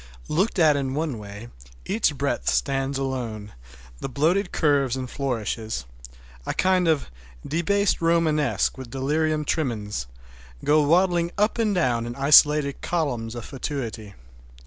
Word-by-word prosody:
Looked 190 +8 0
at 155 -4 +5
in 135 -1 -2
one 150 -6 -2
way 100 +3 -9 0.4
each 190 -7 0
breadth 140 +1 -1
stands 135 0 0
alone, 120 -6 -4 0.5
the - - -4
bloated 170 +9 +1
curves 140 -5 +2
and 130 -1 -4
flourishes—a 60 - -5
kind 185 -2 +2
of 155 - +1 0.4
"debased 190 +6 +1
Romanesque" 160 -5 +1
with 130 -2 -8
delirium 150 +4 0
tremens—go 65 - -2
waddling 170 +2 +3
up 210 +3 +1
and 215 -3 +1
down 120 -9 +1
in 120 - -6
isolated 145 0 +5
columns 125 -9 -2
of 120 - -6
fatuity. 115 -7 -5
140 Hz, 125 wpm, -24 LUFS, 115-160 Hz, 0.5 s, at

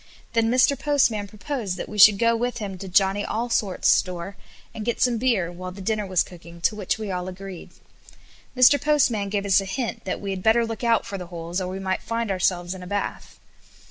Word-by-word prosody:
Then 230 -1 +2
Mr. 255 +2 +3
Postman 265 -8 +1
proposed 210 -1 -4
that - - -5
we 210 - -6
should 205 0 +9
go 230 +2 +3
with 245 +1 -2
him 205 -4 -5
to 195 - -7
Johnny 195 +2 +2
Allsort's 220 -4 -1
store 180 +1 +1 0.4
and 220 -2 -6
get 235 +1 -2
some 240 -2 +2
beer, 215 -9 +1
while 185 +1 -7
the 190 - -11
dinner 210 +1 -2
was 185 -2 +2
cooking, 170 -1 -13
to 215 - +1
which 205 -1 -2
we 215 -3 -5
all 180 0 -3
agreed. 185 -1 -8 0.9
Mr. 255 +3 +6
Postman 250 -9 +2
gave 200 0 -2
us 195 0 +4
a - - -6
hint 235 +5 -4
that 185 - -3
we 200 - -4
had 190 -1 -4
better 225 +3 +3
look 225 +1 -6
out 230 -2 +2
for 195 - -6
the 180 - -7
holes, 170 +1 -4
or 185 - -3
we 185 +1 -5
might 190 -1 -2
find 230 -2 -2
ourselves 180 -1 0
in 190 - -9
a 180 - -8
bath. 205 +1 -4
200 Hz, 220 wpm, -24 LUFS, 185-230 Hz, 0.9 s, should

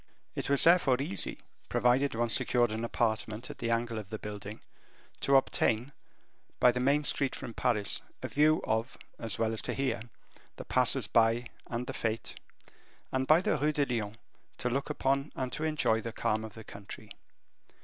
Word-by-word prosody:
It - - -4
was 140 -1 +5
therefore 165 -7 +5
easy, 135 -9 -1 0.3
provided 125 +2 +2
one 120 +1 0
secured 120 0 +2
an 110 +1 -3
apartment 110 -1 -1
at - - -13
the 115 - -2
angle 115 -1 0
of 100 -3 -9
the 110 - -4
building, 105 0 -7 0.6
to 140 - +3
obtain, 125 -1 +2 0.7
by 125 - +6
the 125 - -3
main 140 +4 +2
street 135 -2 +3
from 115 - -7
Paris, 105 -3 +1 0.2
a - - -1
view 155 +2 +3
of, 110 +3 -1 0.2
as 115 -3 -3
well 115 0 0
as 110 - 0
to - - -3
hear, 130 -4 -1 0.5
the - - -8
passers 130 -1 +2
by 115 +2 +2 0.2
and 120 +1 -3
the - - -5
fetes; 115 0 -3 0.8
and, 130 0 -1
by 155 +3 +6
the - - 0
Rue 150 +1 +1
de 145 -1 +2
Lyon, 115 -4 -3 0.4
to 125 - -1
look 135 +3 -1
upon 135 +2 0
and 130 -1 -3
to 150 - -3
enjoy 150 -8 +1
the 115 - -5
calm 110 0 -1
of 110 -1 -8
the 110 - -9
country. 100 -1 -10
120 Hz, 180 wpm, -30 LUFS, 110-135 Hz, 0.8 s, by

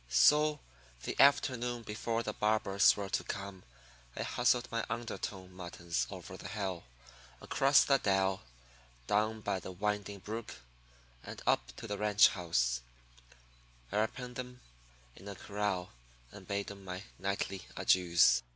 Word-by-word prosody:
So 150 - +5 0.4
the - - -3
afternoon 125 -4 +3
before 115 +2 -2
the 105 - -3
barbers 105 -2 +3
were 100 -1 -4
to - - 0
come 100 -1 -6 0.5
I - - -2
hustled 125 0 +2
my 115 -1 -1
underdone 105 -5 -5
muttons 85 -7 -3
over - - -8
the - - -8
hill, 95 -3 -4 0.5
across 140 +1 +4
the 135 -1 +3
dell, 95 -1 +1 0.6
down 110 - +1
by 95 - -1
the 95 - -8
winding 105 +1 -2
brook, 110 -1 -6 0.7
and - - -8
up - - +1
to - - -8
the 105 -2 -4
ranch 105 0 +6
house, 60 -9 0 1.1
where 105 +2 +1
I 110 - +3
penned 125 +1 -8
'em 125 0 -7 0.5
in 95 - -13
a 100 - -6
corral 100 -3 -2 0.4
and - - -12
bade 100 0 -2
'em 100 -1 -11
my 95 0 -6 0.2
nightly 95 -1 -3
adieus. 85 -9 +5
100 Hz, 140 wpm, -33 LUFS, 95-115 Hz, 1.1 s, ranch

